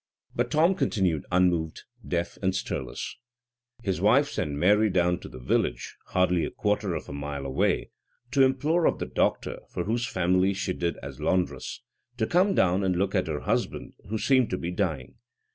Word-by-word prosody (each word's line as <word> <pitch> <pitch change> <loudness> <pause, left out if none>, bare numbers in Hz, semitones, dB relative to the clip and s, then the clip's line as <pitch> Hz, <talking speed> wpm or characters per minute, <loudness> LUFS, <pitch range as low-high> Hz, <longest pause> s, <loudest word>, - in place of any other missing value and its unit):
But 120 0 0
Tom 160 +7 +4
continued 95 - 0
unmoved, 85 -3 +1 0.2
deaf, 85 -1 -2
and 95 -1 +1
stirless. - - -4 0.7
His 95 -4 -1
wife - - +4
sent 75 - -2
Mary 105 +8 +4
down 90 -2 +2
to - - -10
the - - -10
village, 60 - -1
hardly 90 -2 +2
a - - -1
quarter 105 -3 -1
of 80 - -5
a - - -7
mile 70 -1 -5
away, 65 0 0 0.4
to 140 - +3
implore 145 +6 +3
of - - +1
the - - -3
doctor, - - 0
for 90 - -3
whose 115 +4 -1
family 95 +2 +2
she 95 -1 -2
did 85 -1 -1
duty - - -11
as - - -8
laundress, 90 -1 -1 0.3
to 110 - +1
come 185 - +3
down 95 +1 +3
and 95 -1 +1
look 95 +2 0
at 95 -4 +1
her 75 -2 -3
husband, - - -2 0.2
who 110 - -1
seemed 130 +1 +3
to 90 - -1
be 85 0 -4
dying. 80 -9 -3
95 Hz, 185 wpm, -27 LUFS, 85-110 Hz, 0.7 s, Tom